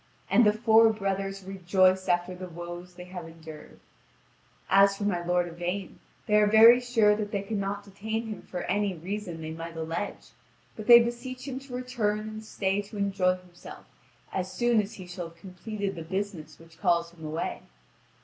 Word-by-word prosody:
And 240 - +6
the - - +6
four 225 +1 +5
brothers 195 -2 -3
rejoice 185 0 +2
after 175 +1 +1
the 180 0 -8
woes 175 +1 -8
they 180 - -9
have 180 -2 -8
endured. 160 -2 -12 0.9
As 195 +1 +5
for 205 - -4
my 180 -4 0
lord 175 0 +1
Yvain 175 +3 -4 0.3
they 210 - +3
are 210 0 +5
very 225 +3 +8
sure 230 -4 +3
that 210 -1 -3
they 200 -2 -2
could 205 +1 -3
not 200 +1 -3
detain 220 +3 -4
him 215 -3 -6
for 180 - -6
any 200 0 0
reason 180 0 -5
they 160 0 -5
might 165 +1 -7
allege, 165 +5 -4 0.4
but 215 - -8
they 235 -1 +11
beseech 245 +2 -4
him 265 -1 -4
to 270 -2 -9
return 245 -5 -1
and 215 0 -7
stay 200 -2 -1
to 205 +1 -10
enjoy 190 -2 +1
himself 180 -1 -13 0.5
as 185 0 -2
soon 240 +2 +2
as 205 +2 -8
he 185 - -9
shall 175 -1 -6
have 165 0 -17
completed 195 +3 -5
the 170 - -7
business 190 -1 -4
which 165 0 -18
calls 170 -3 +1
him 170 -2 -15
away. 155 +2 -3
195 Hz, 185 wpm, -28 LUFS, 175-215 Hz, 0.9 s, they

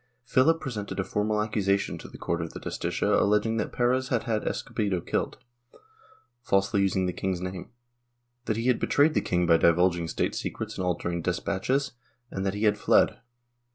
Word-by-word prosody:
Philip 160 +6 +3
presented 105 -9 -5
a - - +1
formal 105 +2 0
accusation 100 -2 0
to - - -9
the - - -12
court 85 -1 -2
of 80 - -5
the - - -7
Justicia - - 0
alleging 105 +2 +2
that 105 - -2
Perez 125 +1 +1
had 120 -4 0
had 110 -2 -1
Escobedo 100 -4 -1
killed, - - -2 1.0
falsely 100 -3 +1
using 95 -1 +1
the 90 - -1
king's 95 -1 -2
name; 90 0 -6 0.8
that 110 - -1
he 115 - -2
had 125 -2 +3
betrayed 150 +2 +3
the - - +2
king 90 -1 0
by 85 -1 +5
divulging 85 0 +3
state - - -1
secrets 110 -1 -4
and 95 - -3
altering 85 -1 -1
despatches, 100 +10 -1 0.4
and 95 - -3
that 95 - -1
he 105 - -3
had 105 -1 +3
fled. - - +3
100 Hz, 180 wpm, -27 LUFS, 90-115 Hz, 1.0 s, by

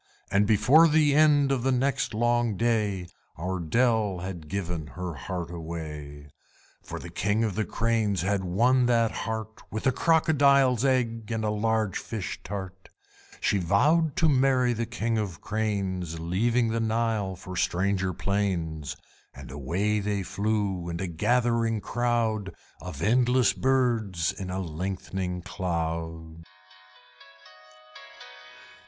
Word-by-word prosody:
And 100 +1 +3
before 125 +11 +6
the 150 -2 +3
end 145 -2 +4
of 135 -3 +1
the 135 +2 +1
next 130 -2 0
long 120 -2 +1
day 105 -5 0 0.3
Our 90 +3 -3
Dell 110 +2 +1
had 85 -3 -6
given 85 -4 -3
her 90 -2 -4
heart 85 +3 -5
away; 75 -4 -7 0.5
For - - -7
the - - -8
King 105 +4 0
of 110 -3 0
the 110 +2 -1
Cranes 110 -5 0
had 95 0 0
won 120 +8 +3
that 115 -2 +3
heart 110 -1 -5
With 110 +5 -5
a 130 - +5
Crocodile's 140 -5 +3
egg 120 -4 0
and 110 -1 -1
a 105 - +1
large 110 -1 0
fish 110 -5 -5
tart. 95 -2 -7 0.5
She 100 - +1
vowed 145 - +2
to 165 - +3
marry 130 -3 +3
the 115 0 -3
King 115 -1 -1
of 100 -5 -3
the - - -19
Cranes, 95 -6 -2
Leaving 115 +8 +1
the 115 +1 -1
Nile 110 -3 0
for 95 0 -9
stranger 95 +2 0
plains; 85 -6 -2 0.4
And - - -10
away 90 +10 -1
they 100 -1 -1
flew 100 -3 -1
in 85 0 -4
a 95 - -2
gathering 115 +5 +1
crowd 115 -3 -1 0.3
Of 85 -4 -6
endless 125 +3 +3
birds 115 -10 +1
in 95 -2 -6
a 90 +1 -3
lengthening 90 +1 -4
cloud. 80 -3 -4
105 Hz, 135 wpm, -27 LUFS, 90-120 Hz, 0.5 s, before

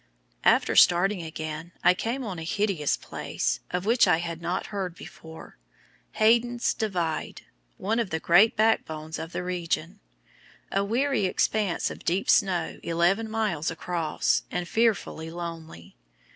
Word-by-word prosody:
After - - +3
starting 185 +2 +5
again 160 +1 -6
I 180 - +6
came 235 +8 -3
on 190 -7 -5
a - - -6
hideous 185 -4 0
place, - - -3
of 180 +1 -3
which 235 +3 +4
I - - +4
had 170 -1 -5
not 170 +2 -2
heard 185 -4 -3
before, 160 - -12 0.5
Hayden's 235 +2 +2
Divide, 175 -7 -3 0.3
one 220 +4 -1
of 230 -5 -1
the 160 - -2
great 190 +8 +5
back 220 +1 +3
bones 155 0 -7
of 165 - -6
the 180 - -4
region, 175 -2 -3 0.7
a 195 - +1
weary 245 +2 +1
expanse 195 0 0
of - - -10
deep 185 +3 +1
snow 175 -4 +1
eleven 175 +7 +1
miles 210 -9 -1
across, 165 -1 -1
and 180 -1 -3
fearfully 210 -7 0
lonely. 165 - -8
180 Hz, 145 wpm, -26 LUFS, 165-215 Hz, 0.7 s, I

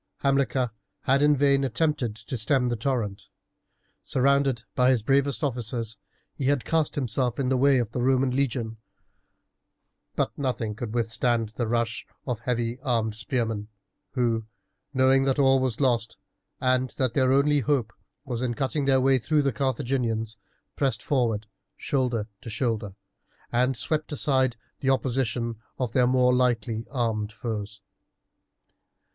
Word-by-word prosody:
Hamilcar 135 -3 +1 0.3
had 135 +2 +2
in 150 0 +5
vain 140 0 +3
attempted 130 -3 0
to 110 +4 -6
stem 125 +2 +1
the 120 - 0
torrent. 110 -5 -2 0.7
Surrounded 135 -2 +2
by 125 0 +3
his 125 -5 +2
bravest 140 +4 +1
officers, 115 -4 -3 0.3
he 135 - -4
had 140 -2 +1
cast 160 -2 +1
himself 125 -2 -1
in 130 -2 +1
the 130 - +2
way 140 +1 +5
of 120 -3 -1
the 120 - -2
Roman 130 +1 +3
legion; 120 -4 -1 1.4
but - - -1
nothing 125 -6 -2
could 115 +1 -5
withstand 115 -1 +1
the 115 +1 -3
rush 115 0 -1 0.2
of 125 -4 -2
the 115 - -26
heavy 120 0 -1
armed 115 -5 0
spearmen, 110 -2 -2 0.5
who, 115 -4 0 0.4
knowing 135 0 +4
that 135 0 +1
all 135 -1 +5
was 130 -3 -1
lost, 120 -5 +1 0.4
and 130 0 +2
that 130 -4 +1
their 130 0 +3
only 145 +2 +4
hope 125 -4 0 0.3
was 125 -3 -3
in 120 -2 -1
cutting 140 +2 -1
their 135 -1 +4
way 135 0 +4
through 150 +5 +1
the 140 -2 +1
Carthaginians, 120 -3 -1 0.4
pressed 135 -2 0
forward, 115 -6 0 0.3
shoulder 125 -6 -1
to - - -8
shoulder, 110 -3 -2 0.6
and 125 +1 +2
swept 155 +4 -1
aside 130 -4 +1 0.2
the 135 - 0
opposition 120 -3 0 0.2
of 125 -4 -2
their 125 +1 +3
more 125 0 +4
lightly 115 -3 0
armed 110 -5 -1
foes. 105 -2 -5
125 Hz, 145 wpm, -26 LUFS, 115-135 Hz, 1.4 s, in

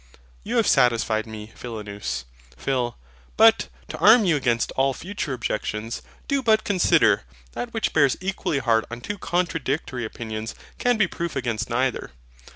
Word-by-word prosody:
You - - -2
have - - +4
satisfied 115 -2 +3
me, 110 0 -8
Philonous. 105 - -5 0.3
PHIL. 125 - -1 0.4
But, - - +6 0.2
to - - -6
arm 220 +1 +7
you 170 -4 +3
against 120 -5 +1
all 135 0 +1
future 185 -4 -5
objections, 115 -2 -3 0.3
do 280 -1 +1
but 220 -3 +3
consider: 185 - +3 0.3
That 240 - -5
which 225 -2 -1
bears 140 -4 +4
equally 185 -5 -2
hard 115 -4 +2
on 120 +1 -7
two 205 +9 -5
contradictory 165 -7 -1
opinions 110 0 -5 0.2
can 245 -1 +2
be 215 - +4
proof 170 -2 -4
against 120 -4 -2
neither. 125 +2 0
130 Hz, 150 wpm, -24 LUFS, 115-180 Hz, 0.4 s, arm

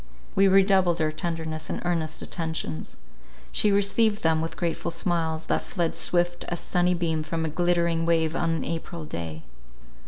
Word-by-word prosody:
We 195 0 +5
redoubled 190 -3 +4
our 155 -1 +1
tenderness 160 -1 -4
and - - -2
earnest 165 -3 -1
attentions. 160 - -4 0.5
She 210 - +3
received 205 +2 +2
them 160 -1 +3
with 165 - -4
grateful 170 -1 -1
smiles, 165 -2 -1
that - - +1
fled 170 -4 -2
swift 175 0 0
as 175 - -3
sunny 180 0 +1
beam 165 -2 0
from 160 +1 -2
a - - -1
glittering 170 0 +1
wave 160 -1 +2
on 170 - +1
an 165 0 0
April 165 0 -4
day. 80 - -6
170 Hz, 160 wpm, -26 LUFS, 160-175 Hz, 0.5 s, We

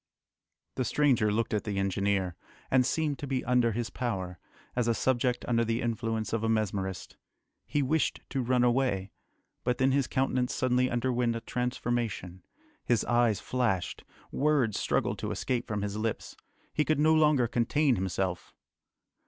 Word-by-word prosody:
The 130 - +1
stranger 125 -5 +2
looked 110 +1 0
at 105 - 0
the 100 -2 -3
engineer, 95 -2 0 0.4
and 130 -1 +4
seemed 150 -1 -1
to 145 - -5
be 130 -1 -2
under 125 -1 +3
his 115 +1 -3
power, 95 -8 -3 0.4
as 120 -1 +1
a 115 - +2
subject 125 0 0
under 115 -1 +2
the 115 0 0
influence 115 -2 -2
of 115 -1 0
a 110 - +1
mesmerist. 100 -4 -2 0.5
He 145 - +1
wished 155 +4 0
to 135 - 0
run 125 0 +2
away. 120 -6 +1 0.5
But 125 0 0
then 130 +1 +3
his 140 -1 +2
countenance 130 -2 0
suddenly 125 0 +2
underwent 120 -1 0
a - - -2
transformation. 120 -6 -2 0.4
His 120 -3 +1
eyes 120 -4 +2
flashed. 120 -8 -1 0.3
Words 140 -7 +1
struggled - - 0
to - - -3
escape 125 -2 -2
from 105 -2 -2
his 100 0 -3
lips. 110 0 -3 0.4
He 150 - +2
could 155 -1 +1
no 155 +1 +5
longer 150 -6 +4
contain 125 +4 +2
himself!... 95 -2 -3
120 Hz, 160 wpm, -29 LUFS, 105-130 Hz, 0.5 s, no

